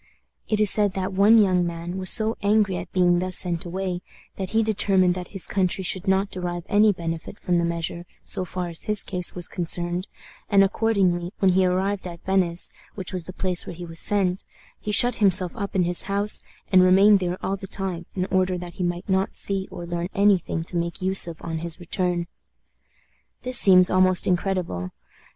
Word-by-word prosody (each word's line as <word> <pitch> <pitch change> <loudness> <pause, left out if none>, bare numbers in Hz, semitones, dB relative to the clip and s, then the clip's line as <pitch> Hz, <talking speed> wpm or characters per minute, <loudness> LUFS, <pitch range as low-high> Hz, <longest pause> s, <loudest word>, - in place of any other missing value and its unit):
It 215 - 0
is 210 -2 +4
said 205 -2 +2
that 190 0 -4
one 205 +4 +5
young 185 -4 +3
man 170 +1 -5
was 185 -1 +4
so 220 0 +5
angry 200 -2 +1
at 175 - -8
being 175 -1 +2
thus 185 0 0
sent 175 -2 -1
away 180 0 -4 0.3
that 190 -2 -5
he 225 0 +1
determined 195 -4 +2
that 180 0 -7
his 195 -3 0
country 190 -1 0
should 185 0 -1
not 190 +1 +1
derive 175 -1 -5
any 210 +1 +4
benefit 165 +1 -6
from 175 -1 0
the 170 - 0
measure, 170 +1 -4 0.2
so - - +1
far 180 0 -5
as 165 - -4
his 210 -1 -1
case 180 -2 +1
was 175 -2 0
concerned, 175 +1 +2 0.4
and 200 -2 +5
accordingly, 190 -4 0
when 190 -1 +2
he 185 0 +3
arrived 190 +1 -2
at 170 -1 -11
Venice, 180 -3 +1 0.2
which 190 -3 -5
was 180 -3 -3
the 185 - -8
place 185 -1 -1
where - - -7
he 175 +1 -8
was 165 -1 -5
sent, 195 -2 0 0.4
he 210 - -5
shut 245 +4 +4
himself 190 -3 +2
up 200 -2 -6
in 185 - +2
his 175 0 +2
house, 200 +1 -1 0.3
and 185 -1 +6
remained 195 +3 +5
there 180 -1 -3
all 195 - -1
the 195 0 -9
time, 185 -3 -4
in 185 -1 -1
order 185 -1 +1
that 175 -1 -8
he - - 0
might 175 +1 -3
not 190 0 -1
see 195 -1 -1
or 180 -2 -8
learn 170 +1 -4
any 200 -1 +4
thing 165 -1 -5
to 175 +1 -3
make 170 +1 -4
use 190 -1 +3
of 165 -1 -8
on 165 -1 -4
his 170 +1 -3
return. 175 -1 -2 1.2
This 255 -1 +3
seems 185 -2 +5
almost 185 0 +3
incredible. 180 - -2
185 Hz, 205 wpm, -23 LUFS, 175-195 Hz, 1.2 s, and